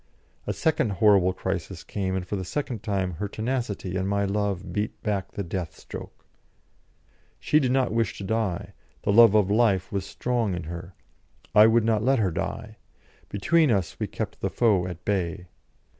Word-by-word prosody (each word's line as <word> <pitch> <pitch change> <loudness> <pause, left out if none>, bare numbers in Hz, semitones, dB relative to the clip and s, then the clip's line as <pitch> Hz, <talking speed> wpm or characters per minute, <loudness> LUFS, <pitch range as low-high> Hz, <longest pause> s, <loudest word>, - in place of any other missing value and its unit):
A - - +1
second 145 -9 +1
horrible 95 -1 +4
crisis 95 -1 -4
came, 95 -2 -2
and 95 -1 -2
for 105 - -3
the 95 - -3
second 120 +2 -3
time 100 -4 -1
her 105 - -2
tenacity 110 -4 -3
and 95 +1 -1
my 100 0 +1
love 100 -3 -2
beat 105 +3 -2
back 100 -4 -2
the 100 - -3
death 90 -1 -5
stroke. - - -10 1.1
She 150 - +3
did 130 -4 +1
not 130 -3 +2
wish 115 -5 0
to - - -6
die, 100 -3 -2 0.3
the 100 - +1
love 115 -1 +8
of 100 -2 +3
life 105 -4 +2
was 100 -1 -1
strong 115 -1 -1
in 85 - -5
her; 85 +2 -8 0.6
I 105 +1 +8
would 115 0 +4
not 110 -2 +2
let 135 +3 +3
her 100 -5 +1
die; - - -4 0.5
between 155 - +3
us 100 -7 0
we - - -1
kept - - -5
the - - 0
foe 100 -7 +2
at 90 -1 -8
bay. 90 -2 -2
100 Hz, 180 wpm, -26 LUFS, 95-115 Hz, 1.1 s, love